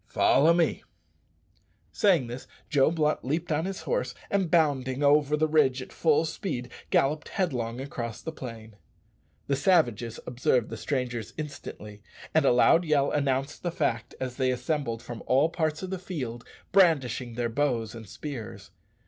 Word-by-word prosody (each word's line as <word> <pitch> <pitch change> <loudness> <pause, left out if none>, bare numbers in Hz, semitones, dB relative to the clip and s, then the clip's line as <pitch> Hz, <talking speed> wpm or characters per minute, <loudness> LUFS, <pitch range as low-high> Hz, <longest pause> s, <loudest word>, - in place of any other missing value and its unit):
Follow 155 +4 +4
me." 170 0 +2 1.1
Saying 180 -10 +3
this, 120 +2 -8 0.2
Joe 140 -2 +4
Blunt 155 -2 0
leaped 160 +6 -2
on 155 +2 +1
his 195 0 -4
horse, - - -2 0.2
and, 195 -4 +1
bounding 145 -5 +2
over 145 +1 +4
the 155 +1 +2
ridge 145 -4 +3
at 130 - -9
full 160 0 +3
speed, 145 - -4 0.2
galloped 150 +3 +1
headlong 125 -10 -2
across 120 -5 -5
the 160 - -5
plain. 115 -7 -9 0.7
The 140 - +1
savages 125 - +2
observed 125 -1 0
the - - -3
strangers 125 -5 -3
instantly, 105 -8 -8 0.3
and 160 -2 +4
a - - +5
loud 125 +7 +5
yell 150 -4 +2
announced 140 0 -1
the 175 - -1
fact 135 -10 -2
as 130 -1 -4
they 130 -2 +2
assembled 125 -2 -2
from 120 -2 -7
all 135 +5 +4
parts 160 0 -1
of 185 - -5
the 190 - -3
field 130 -11 -5 0.3
brandishing 135 - +3
their 120 0 -1
bows 115 -3 0
and 115 -4 -10
spears. 135 -9 -7
140 Hz, 155 wpm, -27 LUFS, 120-155 Hz, 1.1 s, a